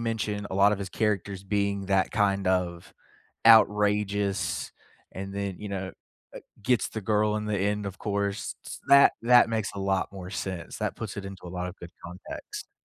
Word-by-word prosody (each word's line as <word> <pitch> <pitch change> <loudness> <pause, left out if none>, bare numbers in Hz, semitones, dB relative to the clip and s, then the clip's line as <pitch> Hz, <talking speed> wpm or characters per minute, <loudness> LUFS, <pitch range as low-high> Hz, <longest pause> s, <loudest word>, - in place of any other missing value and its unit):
mentioned 110 -3 -2
a - - -3
lot 100 +2 +5
of 100 - -1
his 100 -1 -4
characters 100 -3 -1
being 100 -1 -1
that 95 -1 +2
kind 100 -2 +1
of 90 -2 -1 0.5
outrageous 105 -3 +3 0.4
and 95 +1 -6
then, 100 -2 -3
you 105 - -6
know, 95 -1 -3
uh, - - -8 0.7
gets 125 +2 +2
the 110 - -5
girl 105 +1 +1
in 105 0 -3
the 105 - 0
end, 105 +1 0
of 95 -1 -6
course, 100 0 -2
s - - -7
that 140 0 +8
that 120 0 +6
makes 110 -2 -1
a 100 - -6
lot 95 -1 0
more 95 -2 -8
sense, 95 -3 -5
that - - -2
puts - - -6
it 100 - -5
into 95 -2 -9
a - - -6
lot 90 0 -4
of 90 - -9
good 85 -1 -10
context. 90 +1 -8
100 Hz, 190 wpm, -27 LUFS, 95-105 Hz, 0.7 s, that